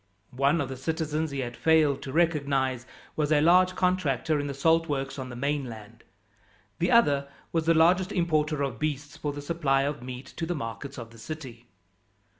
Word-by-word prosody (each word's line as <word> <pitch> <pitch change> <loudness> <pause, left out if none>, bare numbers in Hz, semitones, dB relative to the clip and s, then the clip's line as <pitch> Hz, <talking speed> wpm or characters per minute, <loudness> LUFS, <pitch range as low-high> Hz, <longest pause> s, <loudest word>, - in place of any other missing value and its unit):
One 140 +5 +3
of 140 - -2
the 130 - -6
citizens 160 +2 -2
he 140 -1 -3
had 120 -1 -5
failed 155 -3 +3
to 135 - -6
recognize 140 -6 +1 0.3
was 150 -1 0
a 150 - +5
large 180 +4 +5
contractor 165 -5 +1
in 145 - -2
the 140 - -3
salt 165 +3 +2
works 135 -1 -3
on 130 -1 -5
the 120 - -7
mainland. 125 -5 -4 0.8
The 175 - +1
other 145 -12 +4 0.2
was 165 -1 -1
the 165 - +5
largest 180 +4 +4
importer 155 -5 +1
of 130 -5 -3
beasts 145 -1 -3
for 145 - -3
the 145 0 -7
supply 145 -4 +1
of 145 -2 -3
meat 125 +1 -7
to 165 - -2
the 175 - -1
markets 115 +1 -6
of 115 -2 -8
the 115 - -15
city. 120 -3 -8
145 Hz, 190 wpm, -27 LUFS, 135-160 Hz, 0.8 s, a